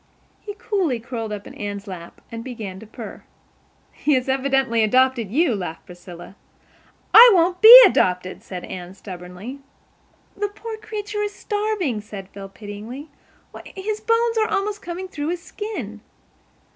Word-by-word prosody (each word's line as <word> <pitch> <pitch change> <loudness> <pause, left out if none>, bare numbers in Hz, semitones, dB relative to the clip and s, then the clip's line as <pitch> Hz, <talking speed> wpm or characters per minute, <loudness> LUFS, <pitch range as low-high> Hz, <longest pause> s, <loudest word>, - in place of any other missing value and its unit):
He 410 -1 -8
coolly 395 - -1
curled 225 -2 -6
up 205 -1 -6
in - - -11
Anne's 205 -1 -6
lap 180 -4 -10
and 230 0 -6
began 220 -7 -7
to 220 - -12
purr. 220 - -9 0.7
"He 295 - 0
has 255 0 -1
evidently 265 -3 +1
adopted 255 -1 +2
you," 295 - +2
laughed 175 -5 -6
Priscilla. 175 +1 -12 0.8
"I 475 +2 +11
won't 355 +1 +2
BE 465 +3 +13
adopted," 185 - +1
said 180 -2 -8
Anne 180 0 -8
stubbornly. 185 +7 -9 0.8
"The 410 +1 -1
poor 440 +2 -8
creature 420 -1 -5
is 415 -1 -3
starving," 410 - -2
said 200 -2 -10
Phil 195 -1 -10
pityingly. 215 +9 -9 0.4
"Why, - - -10
his 420 +2 -4
bones 460 0 +1
are 435 - +2
almost 410 0 -2
coming 355 +2 -6
through 295 -5 -5
his 340 0 -3
skin." 430 +2 -7
260 Hz, 150 wpm, -22 LUFS, -, 0.8 s, BE